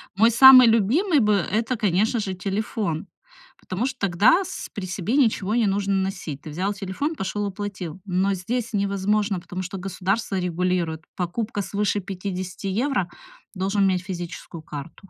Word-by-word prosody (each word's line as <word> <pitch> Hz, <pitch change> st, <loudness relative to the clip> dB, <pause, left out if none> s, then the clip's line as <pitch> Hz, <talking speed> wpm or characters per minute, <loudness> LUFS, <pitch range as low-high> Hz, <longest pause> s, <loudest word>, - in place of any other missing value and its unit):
Мой 225 Hz, +3 st, +5 dB
самый 255 Hz, +1 st, +9 dB
любимый 270 Hz, -, +3 dB
бы 210 Hz, -2 st, +3 dB
это, 215 Hz, +6 st, 0 dB
конечно 215 Hz, +2 st, +1 dB
же, 190 Hz, -3 st, -3 dB
телефон, 195 Hz, -3 st, -3 dB, 0.5 s
потому 205 Hz, +8 st, -3 dB
что 265 Hz, -1 st, -5 dB
тогда 205 Hz, -, +4 dB
с -, -, -7 dB
при 195 Hz, -3 st, -5 dB
себе 190 Hz, +6 st, -2 dB
ничего 220 Hz, -5 st, +2 dB
не 235 Hz, -3 st, +3 dB
нужно 200 Hz, 0 st, 0 dB
носить. 190 Hz, -7 st, -3 dB
Ты 155 Hz, -, -8 dB
взял 185 Hz, +6 st, -1 dB
телефон, 200 Hz, -, -3 dB
пошёл, 205 Hz, 0 st, -3 dB
оплатил. 190 Hz, -4 st, -6 dB
Но 190 Hz, +1 st, +1 dB
здесь 230 Hz, +5 st, -3 dB
невозможно, 200 Hz, 0 st, 0 dB
потому 185 Hz, +2 st, -6 dB
что 195 Hz, +2 st, -6 dB
государство 195 Hz, +2 st, -2 dB
регулирует 175 Hz, -2 st, -1 dB
покупка 205 Hz, +4 st, -2 dB
свыше 205 Hz, +1 st, -1 dB
50 185 Hz, 0 st, -5 dB
евро, 215 Hz, -2 st, 0 dB, 0.5 s
должен 195 Hz, +2 st, 0 dB
иметь 185 Hz, -1 st, +1 dB
физическую 175 Hz, -3 st, -7 dB
карту 155 Hz, +5 st, -9 dB
195 Hz, 150 wpm, -24 LUFS, 185-215 Hz, 0.5 s, самый